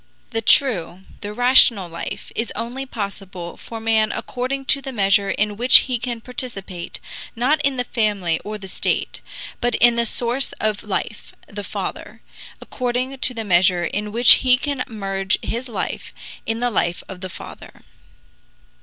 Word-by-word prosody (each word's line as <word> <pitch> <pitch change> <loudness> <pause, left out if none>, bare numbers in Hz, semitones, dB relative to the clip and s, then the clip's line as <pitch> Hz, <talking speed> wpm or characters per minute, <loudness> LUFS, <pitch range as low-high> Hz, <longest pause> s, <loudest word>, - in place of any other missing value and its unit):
The 225 - 0
true, 190 - +2 0.2
the 205 - -6
rational 240 -4 +5
life 170 0 -7
is 230 - -2
only 255 +4 -5
possible 195 -6 -6
for 230 - -8
man 220 -1 +2
according 260 +2 -4
to 280 - -4
the 270 - -6
measure 200 -3 +2
in 210 0 -1
which 245 +3 +7
he 250 -3 -2
can 240 -1 -4
participate, 205 -8 -5 0.4
not 270 +6 +2
in 280 -2 +1
the 250 - +2
family 205 -9 0
or 215 +1 -6
the 195 -2 -9
state, - - -1 0.4
but 245 0 +1
in 240 0 +4
the 235 0 +2
source 245 +4 0
of 215 -1 -2
life 210 0 -4
the 205 0 -7
Father; - - -6 0.4
according 255 +1 -3
to 255 - +1
the 225 - -3
measure 180 -1 +3
in 210 +4 -3
which 235 +2 +8
he 255 -1 +5
can 275 -1 -2
merge 195 -4 -1
his 245 +2 -3
life 225 - -5 0.3
in 225 +1 -2
the 245 0 +1
life 175 -4 -1
of 185 -1 -9
the 185 - -5
Father. - - -11
225 Hz, 165 wpm, -21 LUFS, 195-250 Hz, 0.4 s, which